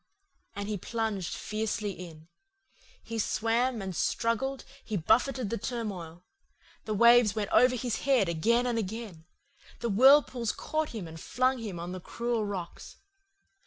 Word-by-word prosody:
"And 200 Hz, 0 st, -4 dB
he 210 Hz, -1 st, -2 dB
plunged 220 Hz, -4 st, -2 dB
fiercely 215 Hz, -1 st, -3 dB
in. 165 Hz, -4 st, -11 dB, 0.8 s
He 225 Hz, 0 st, -5 dB
swam, 230 Hz, +2 st, 0 dB
and 190 Hz, -2 st, -5 dB
struggled, 245 Hz, +8 st, -1 dB, 0.2 s
he 215 Hz, -, -3 dB
buffetted 235 Hz, -, +1 dB
the 230 Hz, -, -2 dB
turmoil. 185 Hz, -8 st, -5 dB, 0.6 s
The 215 Hz, -, -2 dB
waves 235 Hz, -1 st, +6 dB
went 210 Hz, -2 st, -2 dB
over 250 Hz, 0 st, +5 dB
his 240 Hz, -2 st, -2 dB
head 260 Hz, -8 st, +2 dB
again 225 Hz, +9 st, +2 dB
and 240 Hz, -2 st, 0 dB
again, 205 Hz, -5 st, -6 dB, 0.5 s
the 235 Hz, -, -2 dB
whirlpools 250 Hz, +1 st, +5 dB
caught 310 Hz, 0 st, -2 dB
him 210 Hz, -7 st, -6 dB
and 160 Hz, 0 st, -10 dB
flung 255 Hz, +1 st, +1 dB
him 205 Hz, -7 st, -5 dB
on 175 Hz, +1 st, -5 dB
the 185 Hz, -, -5 dB
cruel 235 Hz, +3 st, -2 dB
rocks. 185 Hz, -4 st, -6 dB
220 Hz, 145 wpm, -29 LUFS, 195-240 Hz, 0.8 s, waves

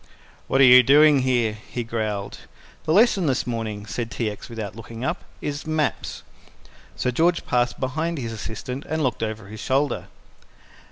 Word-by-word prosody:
"What 135 Hz, -, +3 dB
are -, -, +9 dB
you 125 Hz, 0 st, +9 dB
doing 145 Hz, +1 st, +6 dB
there?" 120 Hz, -4 st, +1 dB
he 120 Hz, +3 st, -6 dB
growled. 110 Hz, -3 st, -3 dB, 0.5 s
"The -, -, 0 dB
lesson 200 Hz, -2 st, +4 dB
this 130 Hz, -2 st, +1 dB
morning," 110 Hz, -4 st, -4 dB
said 115 Hz, +1 st, -4 dB
T. 115 Hz, -2 st, -2 dB
X. 105 Hz, -, -10 dB
without 110 Hz, -3 st, -6 dB
looking 115 Hz, +2 st, -7 dB
up, -, -, -2 dB, 0.2 s
"is 145 Hz, +1 st, -4 dB
maps." 155 Hz, -3 st, -2 dB, 0.7 s
Sir 125 Hz, -, -1 dB
George 165 Hz, +7 st, +2 dB
passed 120 Hz, 0 st, 0 dB
behind 160 Hz, +6 st, -2 dB
his 115 Hz, -4 st, -4 dB
assistant 115 Hz, +5 st, -6 dB
and 160 Hz, 0 st, -1 dB
looked 125 Hz, -4 st, -1 dB
over 110 Hz, -1 st, -3 dB
his 105 Hz, +2 st, -10 dB
shoulder. 140 Hz, +2 st, 0 dB
125 Hz, 165 wpm, -23 LUFS, 110-145 Hz, 0.7 s, are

